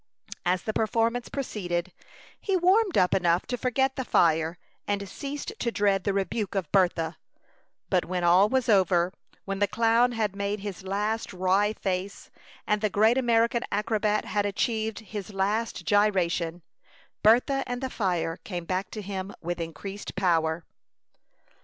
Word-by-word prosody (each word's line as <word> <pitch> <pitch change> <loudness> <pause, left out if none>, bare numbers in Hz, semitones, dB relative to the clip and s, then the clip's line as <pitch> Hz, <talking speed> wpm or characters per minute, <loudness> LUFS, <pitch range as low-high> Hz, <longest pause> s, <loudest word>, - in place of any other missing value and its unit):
As 180 0 +1
the 215 - -2
performance 230 +2 0
proceeded, 185 -9 -3 0.5
he 390 -2 0
warmed 375 +2 +3
up 180 - +4
enough 175 -1 +2
to 250 - -2
forget 265 +2 0
the 260 - -1
fire, 165 -5 +2 0.3
and 200 -1 -1
ceased 285 - -6
to 235 - 0
dread 200 -3 +1
the 200 - +2
rebuke 200 +1 -2
of 185 -6 -2
Bertha; 175 -4 +2 0.7
but 185 -2 +1
when 180 0 -2
all 180 +4 +5
was 260 -1 +1
over, 185 -4 +3 0.3
when 195 0 -3
the 205 - +3
clown 230 +3 +3
had 215 -4 -1
made 200 0 -2
his 200 -3 -6
last 205 +4 -2
wry 190 +3 +2
face, 190 -1 -4 0.3
and 210 0 +1
the 215 - +1
great 220 +6 +3
American 235 -1 +2
acrobat 210 0 0
had 205 -1 0
achieved 220 +1 -1
his 210 -1 -7
last 205 0 -1
gyration, 180 -4 +1 0.6
Bertha 250 +5 +4
and 245 0 -3
the 260 -1 -4
fire 175 -5 -1
came 175 -4 -6
back 185 +2 -2
to 215 - -6
him 190 0 -5
with 175 +1 -4
increased 195 +5 -7
power. 165 -3 +1
200 Hz, 155 wpm, -27 LUFS, 185-225 Hz, 0.7 s, all